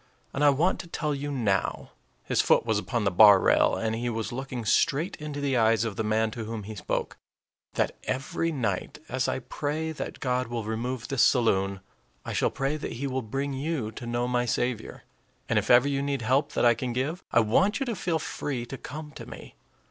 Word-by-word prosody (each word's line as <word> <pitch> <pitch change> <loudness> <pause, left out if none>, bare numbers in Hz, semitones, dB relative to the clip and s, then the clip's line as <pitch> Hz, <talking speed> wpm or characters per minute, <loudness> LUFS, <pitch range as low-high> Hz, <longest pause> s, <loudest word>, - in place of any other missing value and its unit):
And 140 - 0
I 145 - +7
want 160 +7 +2
to 175 - -7
tell 155 -2 -2
you 145 +1 -3
now" 105 -8 -1 0.3
his - - +2
foot - - +3
was 110 -3 +1
upon 120 +1 -2
the 95 - +2
bar 100 +1 +8
rail, - - +4
and 110 0 -1
he 120 +2 -2
was 115 -1 -3
looking 130 -2 -5
straight 155 - +2
into 150 -1 -5
the 140 -2 0
eyes 115 -1 +3
of 110 -3 -3
the 110 - -1
man 110 +1 +1
to 115 0 -5
whom 110 -1 -5
he 110 +2 -7
spoke 105 - -3 0.6
"that - - 0
every 135 +5 -1
night, 115 - -2
as 130 -1 0
I - - 0
pray 150 +4 -3
that 155 - -6
God 125 -2 0
will 115 -1 -3
remove 115 +3 -3
this 135 -3 +1
saloon, 100 -6 +3 0.4
I - - -4
shall - - +2
pray 135 +3 -1
that - - -5
he 130 +5 -4
will 130 -1 -1
bring 135 +5 -3
you 135 -5 -2
to 120 +2 -8
know 120 +1 -1
my 125 0 0
Saviour. 120 -1 -2 0.4
And - - +3
if - - -5
ever 125 +3 +7
you 140 -1 0
need 140 -3 -2
help 135 +5 +1
that - - +2
I 120 - +7
can 120 +1 -3
give, 145 +9 -2
I 115 - +5
want 190 - +2
you 270 - -1
to 235 -3 -2
feel 170 -3 0
free 135 -5 -4
to 135 +2 -8
come 150 +2 -7
to - - -10
me. - - -10
125 Hz, 220 wpm, -27 LUFS, 115-145 Hz, 0.6 s, bar